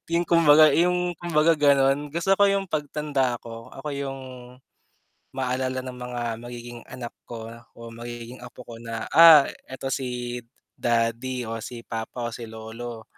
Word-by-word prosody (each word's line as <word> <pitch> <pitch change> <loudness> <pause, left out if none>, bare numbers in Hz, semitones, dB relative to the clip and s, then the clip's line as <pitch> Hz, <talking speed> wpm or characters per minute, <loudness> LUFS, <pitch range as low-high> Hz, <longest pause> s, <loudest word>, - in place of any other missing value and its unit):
Yung 170 +1 +2
kumbaga, 155 -3 +6
yung, 180 +1 +2
kumbaga 165 -1 +3
gano'n, 140 -1 +3
gusto 175 +4 +2
ko 205 - +5
yung 195 0 0
pagtanda 145 -5 -1
ko, 115 +1 -10
ako 135 +3 -8
yung 135 -1 -4 1.2
maalala 130 0 -1
ng 130 -1 -7
mga 125 0 -5 0.2
magiging 120 0 -8
anak 125 -2 -7
ko, 115 -1 -7 0.3
o 115 0 -9
magiging 120 +1 -8
apo 125 0 -11
ko 120 - -10
na, 115 -1 -5
"Ah, 165 -3 +9 0.2
eto 135 +1 -5
si 125 -2 -3 0.4
daddy, 120 +2 0
o 115 0 -5
si 115 +1 -8
papa, 115 +2 -5
o - - -15
si 115 0 -7
lolo." 110 +1 -8
125 Hz, 150 wpm, -25 LUFS, 120-150 Hz, 1.2 s, Ah